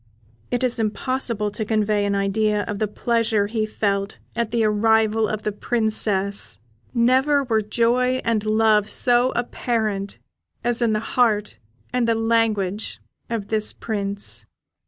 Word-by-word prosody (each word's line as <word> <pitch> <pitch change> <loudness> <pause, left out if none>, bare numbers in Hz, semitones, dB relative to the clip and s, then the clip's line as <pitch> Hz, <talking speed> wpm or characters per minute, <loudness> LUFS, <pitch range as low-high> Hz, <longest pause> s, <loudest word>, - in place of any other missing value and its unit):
It 245 +1 -1
is 250 -1 0
impossible 225 -1 -1
to 215 +2 -3
convey 210 -1 +1
an 200 0 0
idea 205 +1 +1
of 205 0 -5
the 215 - +1
pleasure 225 -1 0
he 215 +1 -1
felt 200 -1 -1 0.2
at 235 -1 -1
the 230 0 +1
arrival 220 +1 +3
of 215 0 -4
the 210 - -1
Princess; 205 - -1 0.3
never 260 +4 +3
were 225 -4 +1
joy 240 +4 +1
and 225 -2 +1
love 215 -1 +3
so 245 0 +3
apparent 220 -4 -2 0.5
as 240 0 0
in 230 -2 +2
the 215 - 0
heart 210 - +1 0.3
and 250 -2 +1 0.2
language 215 -3 0 0.3
of 225 -4 -3
this 215 -1 -1
Prince. 200 -2 -3
220 Hz, 135 wpm, -22 LUFS, 210-235 Hz, 0.5 s, arrival